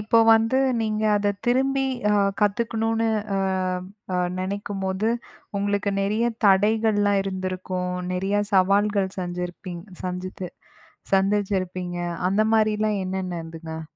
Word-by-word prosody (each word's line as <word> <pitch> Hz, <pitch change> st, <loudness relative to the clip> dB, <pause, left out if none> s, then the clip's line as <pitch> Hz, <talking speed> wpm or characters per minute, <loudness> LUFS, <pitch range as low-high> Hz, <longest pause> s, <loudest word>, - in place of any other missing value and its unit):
இப்போ 220 Hz, +2 st, +3 dB, 0.2 s
வந்து 225 Hz, +4 st, +2 dB, 0.2 s
நீங்க 215 Hz, -1 st, -1 dB
அத 205 Hz, 0 st, +1 dB, 0.2 s
திரும்பி, 270 Hz, +2 st, +2 dB, 0.3 s
அ -, -, +3 dB, 0.3 s
கத்துக்கணுனு 225 Hz, +2 st, +1 dB, 0.3 s
அ, -, -, +1 dB, 0.8 s
அ -, -, +2 dB, 0.2 s
நினைக்கும்போது, 195 Hz, +1 st, -2 dB, 0.5 s
உங்களுக்கு 200 Hz, 0 st, 0 dB
நிறைய 210 Hz, +4 st, +1 dB, 0.2 s
தடைகள்லாம் 205 Hz, 0 st, +3 dB
இருந்திருக்கும். 185 Hz, -1 st, -3 dB, 0.2 s
நிறைய 195 Hz, +3 st, 0 dB
சவால்கள் 200 Hz, +1 st, +3 dB
செஞ்சிருப்பிங் 175 Hz, 0 st, -5 dB, 0.2 s
சஞ்சித்து 185 Hz, 0 st, -4 dB, 0.7 s
சந்திச்சிருப்பீங்க. 190 Hz, -3 st, 0 dB, 0.3 s
அந்த 195 Hz, +3 st, +2 dB
மாதிரிலாம் 215 Hz, -1 st, +2 dB
என்னென்ன 185 Hz, -2 st, -3 dB
இருந்ததுங்க? 160 Hz, 0 st, -7 dB
200 Hz, 100 wpm, -24 LUFS, 185-215 Hz, 0.8 s, இப்போ